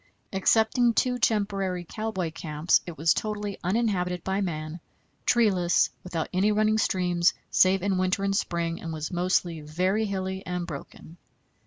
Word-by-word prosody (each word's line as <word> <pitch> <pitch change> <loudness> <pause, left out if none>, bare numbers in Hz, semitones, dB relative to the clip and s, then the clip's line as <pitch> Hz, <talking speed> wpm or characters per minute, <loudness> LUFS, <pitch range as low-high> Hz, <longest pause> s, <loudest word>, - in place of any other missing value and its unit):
Excepting 220 +4 +3
two 250 -1 +1
temporary 200 -5 0
cowboy 215 -7 -3
camps 155 0 +1
it 170 - -7
was 160 +2 +3
totally 210 -2 -3
uninhabited 180 -3 0
by 190 +1 -1
man, 155 -2 -4 0.5
treeless, 190 -7 +3
without 170 -3 -3
any 195 +4 +3
running 215 +1 +2
streams, 180 -4 +2 0.2
save 185 0 +4
in 195 -2 +1
winter 185 +1 0
and 195 0 +1
spring, 170 -3 -1
and 165 - -5
was 155 -1 -4
mostly 175 -2 0
very 185 +8 0
hilly 190 -1 -3
and 180 -1 -3
broken. 160 +1 -9
185 Hz, 145 wpm, -26 LUFS, 170-205 Hz, 0.5 s, save